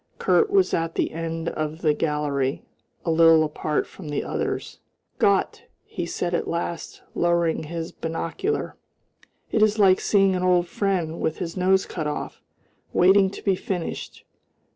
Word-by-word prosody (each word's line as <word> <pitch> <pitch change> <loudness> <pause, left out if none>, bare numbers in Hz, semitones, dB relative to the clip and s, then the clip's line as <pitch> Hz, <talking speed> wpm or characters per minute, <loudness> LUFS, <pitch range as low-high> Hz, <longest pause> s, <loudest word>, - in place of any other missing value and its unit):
Kurt 435 - +3
was 390 -2 +3
at 165 0 -1
the - - 0
end 165 0 -3
of 155 +2 -4
the 155 -2 +4
gallery, 150 -3 -1 0.4
a 165 - +1
little 165 -1 +6
apart 150 0 -1
from 165 -6 -11
the 145 - -2
others. - - -3 0.4
"Gott!" - - +2 0.2
he - - -5
said 175 0 -3
at 170 - -1
last, 170 0 -4
lowering 170 -2 +1
his 165 +1 -5
binocular, 165 - -3 0.8
"it 220 - +1
is 215 0 +4
like 190 -3 +5
seeing 195 -2 +3
an 180 - -1
old 180 -1 +3
friend 175 -4 -1
with 160 - -1
his 165 -2 -5
nose 190 +1 +3
cut 155 -4 -4
off 150 - -5 0.5
waiting 190 +2 +5
to 200 - -10
be 195 - +3
finished. 180 -2 -5
170 Hz, 155 wpm, -24 LUFS, 160-190 Hz, 0.8 s, little